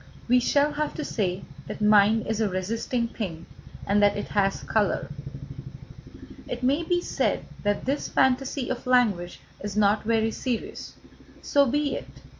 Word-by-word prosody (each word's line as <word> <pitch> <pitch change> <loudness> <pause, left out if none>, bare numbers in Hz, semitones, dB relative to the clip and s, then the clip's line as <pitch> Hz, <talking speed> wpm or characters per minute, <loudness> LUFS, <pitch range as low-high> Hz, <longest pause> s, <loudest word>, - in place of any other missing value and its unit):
We 250 +1 +5
shall 285 +4 +2
have 300 0 -2
to 305 - -4
say 190 -3 -2 0.2
that - - -6
mind 210 +1 +5
is 220 0 -1
a 215 - +2
resisting 225 +6 -1
thing, 175 -8 -6 0.4
and 205 +1 +2
that 205 0 +4
it 205 - -4
has 195 -1 +1
colour. 210 -3 0 1.4
It - - -5
may 275 +5 +2
be 350 +1 0
said - - -1 0.2
that 205 0 -1
this 275 +2 -1
fantasy 265 0 +1
of 255 0 -5
language 210 -9 +2 0.2
is 205 0 -4
not 210 0 +4
very 225 0 +1
serious. 245 0 -4 0.5
So 280 -1 +3
be 290 +3 0
it. - - -6
225 Hz, 155 wpm, -26 LUFS, 205-260 Hz, 1.4 s, We